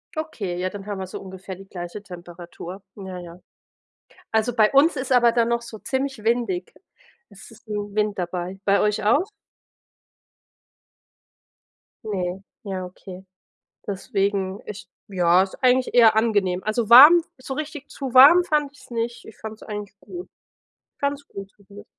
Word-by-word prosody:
Okay, 235 Hz, -, -4 dB
ja, 185 Hz, +1 st, -1 dB
dann 195 Hz, 0 st, -9 dB
haben 205 Hz, -2 st, -5 dB
wir 190 Hz, -, -5 dB
so -, -, -7 dB
ungefähr 190 Hz, 0 st, -9 dB
die 195 Hz, +1 st, -14 dB
gleiche 175 Hz, +2 st, -7 dB
Temperatur. 175 Hz, 0 st, -10 dB
Ja, 190 Hz, -3 st, -8 dB
ja. 175 Hz, 0 st, -11 dB, 0.9 s
Also, 220 Hz, +1 st, 0 dB
bei 215 Hz, -3 st, +4 dB
uns 285 Hz, +5 st, +5 dB
ist 260 Hz, 0 st, -4 dB
aber 240 Hz, -2 st, +5 dB
dann 235 Hz, -1 st, +2 dB
noch 235 Hz, 0 st, 0 dB
so 230 Hz, -2 st, -10 dB
ziemlich 265 Hz, 0 st, -3 dB
windig. 220 Hz, -6 st, -1 dB, 0.6 s
Es 195 Hz, -1 st, -14 dB
ist 230 Hz, +2 st, -18 dB
'n 205 Hz, -1 st, -4 dB
Wind 210 Hz, -1 st, 0 dB
dabei. 180 Hz, +1 st, -4 dB
Bei 200 Hz, 0 st, +3 dB
euch 210 Hz, 0 st, +1 dB
auch? 285 Hz, -, +2 dB, 2.8 s
Ne, 190 Hz, -3 st, -3 dB, 0.2 s
ja 190 Hz, -3 st, -4 dB
okay. 185 Hz, +1 st, -11 dB, 0.6 s
Deswegen, 195 Hz, -1 st, -2 dB
ich 210 Hz, -, -8 dB, 0.2 s
ja, 180 Hz, -1 st, +4 dB
ist 190 Hz, -, -5 dB
eigentlich 255 Hz, 0 st, +3 dB
eher 225 Hz, -3 st, +6 dB
angenehm. 205 Hz, -5 st, +1 dB
Also, 215 Hz, +1 st, -1 dB
warm, 295 Hz, +8 st, +10 dB, 0.2 s
so 260 Hz, +1 st, -6 dB
richtig 300 Hz, 0 st, -6 dB
zu 270 Hz, -3 st, -6 dB
warm 285 Hz, +8 st, +8 dB
fand 300 Hz, -4 st, 0 dB
ich's 290 Hz, -, -18 dB
nicht, 235 Hz, 0 st, -4 dB
ich 220 Hz, -, -13 dB
fand's 220 Hz, 0 st, -9 dB
eigentlich 205 Hz, -1 st, -7 dB
gut 355 Hz, 0 st, -9 dB, 0.7 s
ganz 280 Hz, 0 st, -2 dB
gut 195 Hz, 0 st, -9 dB
zumindest. 200 Hz, 0 st, -15 dB
210 Hz, 155 wpm, -23 LUFS, 190-245 Hz, 2.8 s, warm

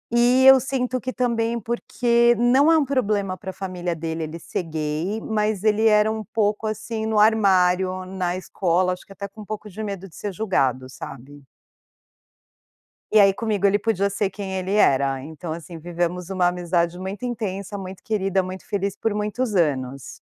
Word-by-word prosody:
E 245 Hz, +2 st, +5 dB
eu 265 Hz, 0 st, +9 dB
sinto 255 Hz, -1 st, -2 dB
que 255 Hz, -, -3 dB
também 235 Hz, -2 st, 0 dB
porque 235 Hz, +1 st, +2 dB
não 260 Hz, +6 st, +4 dB
é 325 Hz, -, +6 dB
um 300 Hz, -, +2 dB
problema 210 Hz, -8 st, 0 dB
para 190 Hz, 0 st, -8 dB
a -, -, -5 dB
família 180 Hz, -3 st, -4 dB
dele, 160 Hz, 0 st, -4 dB
ele 155 Hz, +2 st, -6 dB
ser -, -, -3 dB
gay, 160 Hz, +5 st, -3 dB
mas 210 Hz, -2 st, -1 dB
ele 220 Hz, +1 st, +3 dB
era 210 Hz, 0 st, +4 dB
um 220 Hz, 0 st, -4 dB
pouco 215 Hz, +1 st, -1 dB
assim 220 Hz, +1 st, -4 dB
no 220 Hz, -1 st, 0 dB
armário, 185 Hz, -3 st, +3 dB
na 185 Hz, -1 st, -2 dB
escola, 180 Hz, -1 st, 0 dB
acho 180 Hz, -, -10 dB
que -, -, -19 dB
até 200 Hz, +1 st, -6 dB
com 215 Hz, -, -13 dB
um -, -, -9 dB
pouco 215 Hz, +1 st, -6 dB
de 210 Hz, +3 st, -8 dB
medo 195 Hz, -2 st, -5 dB
de 165 Hz, -, -18 dB
ser 205 Hz, -, -4 dB
julgado, 135 Hz, -, 0 dB
sabe. 135 Hz, +2 st, -10 dB, 1.7 s
E 215 Hz, -, +5 dB
aí 195 Hz, -1 st, +7 dB
comigo, 205 Hz, -1 st, 0 dB
ele 200 Hz, +1 st, +3 dB
podia 200 Hz, -2 st, 0 dB
ser 200 Hz, 0 st, 0 dB
quem 195 Hz, -1 st, -6 dB
ele 190 Hz, +1 st, -2 dB
era, 135 Hz, -8 st, +3 dB
então 160 Hz, +2 st, -7 dB
assim 165 Hz, +1 st, -8 dB
vivemos 175 Hz, +1 st, -3 dB
uma 185 Hz, -2 st, +2 dB
amizade 175 Hz, -1 st, 0 dB
muito 195 Hz, +6 st, -6 dB
intensa, 205 Hz, -4 st, -4 dB
muito 190 Hz, -1 st, -8 dB
querida, 195 Hz, -3 st, 0 dB
muito 185 Hz, +1 st, -7 dB
feliz 200 Hz, -1 st, -1 dB
por 225 Hz, -2 st, -1 dB
muitos 210 Hz, +3 st, -2 dB
anos. 135 Hz, -5 st, 0 dB
195 Hz, 185 wpm, -23 LUFS, 180-220 Hz, 1.7 s, eu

